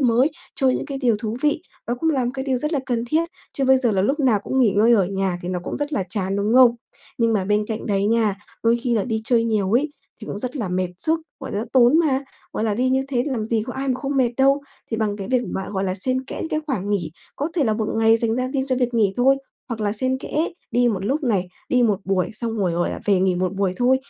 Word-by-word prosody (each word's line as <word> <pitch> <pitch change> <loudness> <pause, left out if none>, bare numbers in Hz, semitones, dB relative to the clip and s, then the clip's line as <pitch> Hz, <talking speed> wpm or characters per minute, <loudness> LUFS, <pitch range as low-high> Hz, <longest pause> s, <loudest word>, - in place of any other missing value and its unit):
mới, 255 +3 +3 0.3
chơi 265 -2 +3
những - - -4
cái 275 -2 -4
điều 240 -5 +2
thú 220 0 -3
vị, 300 0 +1 0.2
nó 240 - 0
cũng 325 - +2
làm 255 -4 0
cái 265 0 -4
điều 265 -2 +1
rất 300 +6 -2
là 295 - +2
cần 235 -2 -1
thiết. 320 +7 0 0.2
Chứ 275 - -1
bây 265 0 +5
giờ 245 -4 +1
là 190 -2 +2
lúc 275 +9 +1
nào 250 -7 +3
cũng 265 - -1
nghỉ 225 -6 +4
ngơi 225 +3 +5
ở 200 -6 +4
nhà 190 -2 -1
thì 175 - -4
nó 180 -1 -1
cũng - - -4
rất 290 +1 -3
là 195 - 0
chán, 195 0 -1
đúng 205 +3 +1
không? 250 -2 +7 0.4
Nhưng 230 -1 +3
mà 200 -4 +1
bên 210 +2 +1
cạnh 220 0 -4
đấy 200 -2 +1
nha, 220 -3 +2 0.3
đôi 230 +1 +4
khi 245 -2 +1
là 215 - +1
đi 220 -3 -1
chơi 230 -2 +3
nhiều 210 -4 0
ấy, 280 +6 +2 0.3
thì 215 - -8
cũng - - -5
rất 255 +6 -4
là 215 -7 -2
mệt 185 0 -1
sức, 320 +7 +1 0.2
gọi 270 - -6
là, 205 +2 -1
tốn 255 +4 +6
mà, 280 -5 +1 0.3
gọi - - -1
là, 215 -2 +1
đi 255 +3 +1
như 265 +1 +2
thế 250 -3 +1
thì 290 - -2
làm 225 -4 -2
gì 225 -2 +1
có 250 - -4
ai 270 +2 -3
mà 255 - +2
không 275 +1 -2
mệt 250 -3 +3
đâu. 275 +1 +3 0.3
Thì 225 - -1
bằng 215 -2 -1
cái 195 -2 -6
việc 255 -1 +2
mà 190 - -3
gọi 195 -1 -1
là, 185 -1 -1
xen 255 +7 -1
kẽ - - -7
những - - -3
cái 310 - 0
khoảng 205 -9 -2
nghỉ, 180 -6 -1 0.3
có 290 - -1
thể 320 -6 +2
là 220 -3 +1
1 220 -1 -1
ngày 225 0 +5
dành 230 -1 0
ra 255 0 0
đi 270 +1 -1
cho 255 - +1
việc 245 -1 0
nghỉ 210 -4 +3
thôi, 265 +2 +4 0.3
hoặc 230 -2 -4
là 205 -1 0
xen 260 +4 0
kẽ 310 +4 -1 0.2
đi 245 0 +3
một 195 -4 -2
lúc 280 +8 0
này, 200 -8 0 0.2
đi 250 -1 +3
1 210 -4 +2
buổi 190 -2 0
xong 225 +1 -2
rồi, 185 -4 +1
gọi 175 +1 0
là, - - -5
về 195 -3 +3
nghỉ 185 -1 +2
1 185 +1 -1
buổi 195 -1 0
thôi. 250 +2 +4
235 Hz, 290 wpm, -22 LUFS, 205-265 Hz, 0.4 s, không